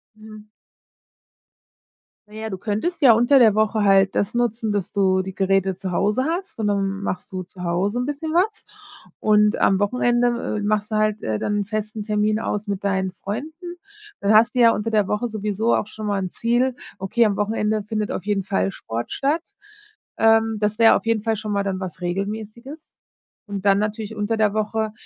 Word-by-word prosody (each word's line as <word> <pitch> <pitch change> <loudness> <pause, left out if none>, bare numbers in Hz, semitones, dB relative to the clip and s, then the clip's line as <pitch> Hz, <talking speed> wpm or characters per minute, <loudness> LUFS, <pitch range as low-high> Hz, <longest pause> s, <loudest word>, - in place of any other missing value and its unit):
Mhm. 215 0 -13 1.8
Na 210 - -17
ja, 220 0 -5
du 190 - -5
könntest 220 - -3
ja 255 -5 +8
unter 240 +5 +4
der 220 -4 +5
Woche 215 0 +1
halt 195 -1 +4
das 205 +3 -1
nutzen, 230 -2 -1
dass 200 -3 -2
du 190 -2 +2
die 190 0 -7
Geräte 195 -1 +1
zu 190 -2 -5
Hause 210 +8 +1
hast. 345 - -4
Und 210 - 0
dann 195 -1 -1
machst 190 -2 -4
du 185 -1 -4
zu 180 0 -11
Hause 190 +7 0
'n 250 - -1
bisschen 305 +2 -4
was. 415 +5 0 0.6
Und 210 0 +4
am 195 - +3
Wochenende, 240 +2 +1
äh, - - -2
machst 210 +1 -1
du - - 0
halt, 215 0 0
äh, 110 -1 -1
dann 205 - -1
'n - - -4
festen 215 0 -4
Termin 210 0 0
aus 210 -1 -3
mit 200 0 -3
deinen 190 -2 -1
Freunden. 315 - -7 0.4
Dann 200 +2 +2
hast 225 +4 +5
du - - +1
ja 230 -1 +7
unter 215 +2 -3
der 210 -3 +2
Woche 210 +5 -1
sowieso 215 +1 -1
auch 210 - 0
schon 215 0 -8
mal 200 -1 0
'n 185 - -3
Ziel: 240 +5 0 0.2
„Okay, 215 +5 +1
am 205 -2 0
Wochenende 210 0 0
findet 215 0 -3
auf 190 - -5
jeden 200 -2 0
Fall 195 0 0
Sport 115 -6 -5
statt.” 320 +7 -1 0.6
Ähm, 225 0 +3
das 210 +1 -1
wäre 225 -1 +7
auf - - -2
jeden 230 -2 +1
Fall 225 -1 0
schon 215 0 -4
mal 200 0 0
dann 195 -1 -2
was 185 -1 -7
Regelmäßiges. 215 - -5 0.6
Und 200 -2 -5
dann 195 0 +4
natürlich 215 +1 -3
unter 210 +2 -1
der 215 -2 +2
Woche, 215 0 -1
215 Hz, 200 wpm, -22 LUFS, 200-230 Hz, 1.8 s, ja